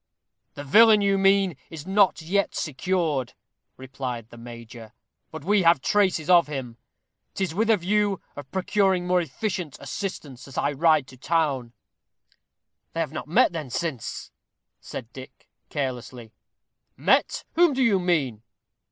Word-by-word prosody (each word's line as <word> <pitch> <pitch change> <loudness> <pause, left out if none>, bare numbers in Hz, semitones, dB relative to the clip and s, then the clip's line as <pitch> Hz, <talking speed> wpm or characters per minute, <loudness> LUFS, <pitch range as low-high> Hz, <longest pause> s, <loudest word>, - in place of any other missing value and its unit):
"The 145 - -7
villain 215 +8 +6
you 200 -1 +2
mean 195 -3 +3
is 160 -2 -9
not 190 -3 +2
yet 200 +5 0
secured," 150 -4 -1 0.4
replied 125 -3 -6
the 120 - -12
major, 115 -1 -11 0.4
"but 160 -2 -9
we 205 +1 +3
have 170 -4 +5
traces 185 -1 +1
of 175 -3 +5
him. 130 -5 -6 0.6
'Tis 190 -4 -2
with 220 +5 0
a 220 - +5
view 200 +2 0 0.2
of 145 -2 -9
procuring 190 -1 +1
more 180 0 +2
efficient 175 0 -4
assistance 150 -10 -6
that 135 - -12
I 145 - +1
ride 155 0 +3
to 130 - -14
town." 140 -5 -1 1.2
"They 165 - -4
have 160 -4 -1
not 155 - -6
met 165 - +4
then, 155 -6 -5
since?" 135 -3 -4 0.5
said 120 -2 -9
Dick, 130 -1 -12 0.2
carelessly. 125 -5 -5 0.6
"Met! - - +2
whom 340 -2 +4
do 265 0 +1
you 210 -6 +3
mean?" 150 -12 0
160 Hz, 145 wpm, -25 LUFS, 130-190 Hz, 1.2 s, villain